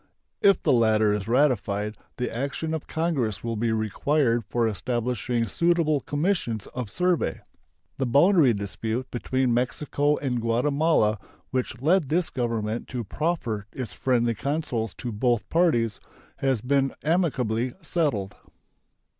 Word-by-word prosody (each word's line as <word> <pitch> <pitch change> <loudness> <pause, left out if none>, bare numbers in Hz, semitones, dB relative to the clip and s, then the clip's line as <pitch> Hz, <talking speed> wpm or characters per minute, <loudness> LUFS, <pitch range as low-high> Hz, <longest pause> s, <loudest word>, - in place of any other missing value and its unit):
If 200 -2 +4
the - - +4
latter 110 -3 +4
is 105 -1 -3
ratified, 110 -5 +1 0.2
the 125 -2 -3
action 140 +5 -2
of 160 - -4
Congress 155 -10 -1
will 115 -1 -2
be 115 +1 0
required 115 +3 +1
for 120 -1 +1
establishing 120 +2 -1
suitable 165 - +2
commissions 145 - -1
of 125 -4 -4
survey. 175 - 0 0.6
The 135 - +1
boundary 145 +2 +5
dispute 110 +5 -4
between 130 0 0
Mexico 145 +4 0
and 125 -4 -2
Guatemala, 120 -1 +2 0.3
which 125 -2 -2
led 165 -2 +3
this 170 +1 +1
Government 115 -3 -2
to 125 -2 -4
proffer 115 - -2
its 130 -4 -6
friendly 120 -3 +1
counsels 120 - -2
to 120 - -5
both 120 +1 0
parties, 120 - +2 0.4
has 135 -5 0
been 135 +2 +1
amicably 130 - 0
settled. 115 - -1
125 Hz, 130 wpm, -25 LUFS, 115-150 Hz, 0.6 s, boundary